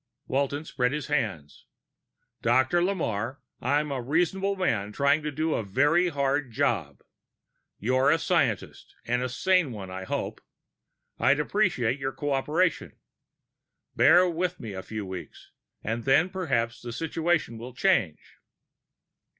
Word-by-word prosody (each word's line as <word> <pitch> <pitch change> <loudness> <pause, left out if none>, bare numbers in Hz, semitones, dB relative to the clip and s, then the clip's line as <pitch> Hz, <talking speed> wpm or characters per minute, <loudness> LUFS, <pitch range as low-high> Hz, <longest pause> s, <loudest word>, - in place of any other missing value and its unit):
Walton 140 +3 -1
spread 125 -3 0
his 150 -2 -3
hands. 95 - -3 0.7
"Dr. 130 +7 +3
Lamarre, 130 - -1 0.2
I'm 150 +1 +1
a 135 -2 -2
reasonable 180 +9 0
man 110 - 0
trying 140 +6 +2
to 150 0 -3
do 155 +2 -1
a - - 0
very 145 - +3
hard 140 -3 0
job. 115 - -1 0.7
You're 130 +5 +2
a - - +4
scientist 140 - -1
and 125 +1 0
a 125 - -2
sane 180 +3 +2
one, 100 -4 -7
I 95 0 -6
hope. - - -3 0.8
I'd 140 +3 +4
appreciate 150 - +1
your 135 0 -3
cooperation. 150 +5 0 1.0
Bear 175 +5 +6
with 180 +1 -2
me 110 -3 -6
a 95 - -5
few 110 +1 -6
weeks, 95 -1 -9 0.3
and 115 +2 -2
then 155 +8 +4
perhaps 125 -11 -1
the 120 - -6
situation 160 -3 -1
will 120 +2 -9
change." 120 - 0
140 Hz, 135 wpm, -27 LUFS, 115-165 Hz, 1.0 s, Bear